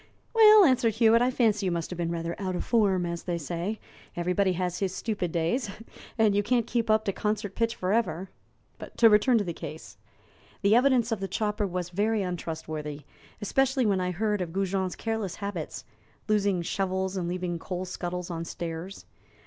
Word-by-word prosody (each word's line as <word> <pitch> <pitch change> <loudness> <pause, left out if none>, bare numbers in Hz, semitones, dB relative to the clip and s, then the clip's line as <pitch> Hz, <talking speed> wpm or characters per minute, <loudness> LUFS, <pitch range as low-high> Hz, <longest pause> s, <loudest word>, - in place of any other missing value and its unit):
"Well," 430 -3 +8
answered 250 -6 +3
Hewitt, 230 0 +5
"I 245 - +3
fancy 215 -6 +1
you - - +1
must 170 0 -3
have 180 - -5
been 170 -1 -1
rather 170 0 -3
'out 185 -2 -2
of - - -3
form,' 195 -6 +2
as 170 0 -4
they 175 -2 -2
say; 170 +7 -4 0.4
everybody 180 +2 +1
has 180 0 -2
his 190 -2 -1
stupid 200 -7 -2
days, 170 +9 0 0.5
and 220 -2 +4
you 205 - +3
can't 235 +2 +1
keep 230 -1 -1
up 215 0 +3
to 195 - 0
concert 210 -1 -2
pitch 230 +1 0
forever. 190 -2 -1 0.7
To 230 - +7
return 215 +4 +5
to 210 - +1
the 175 -3 -4
case. 160 -1 -9 0.7
The 200 +2 +5
evidence 250 -2 +3
of 225 - 0
the 195 - -3
chopper 210 0 -1
was 180 -1 -3
very 210 +3 +1
untrustworthy, 160 -4 -5 0.4
especially 265 +3 +2
when 195 -3 +2
I 180 - -1
had 180 - -3
heard 210 0 0
of 170 -2 -4
Goujon's 190 -1 -1
careless 220 -5 -3
habits 200 -6 -5 0.4
losing 200 -4 +1
shovels 190 +1 -1
and 180 -2 -2
leaving 175 -1 -3
coal 185 +1 -4
scuttles 180 -1 -5
on 165 -1 -3
stairs. 170 +3 -6
195 Hz, 185 wpm, -27 LUFS, 175-220 Hz, 0.7 s, Well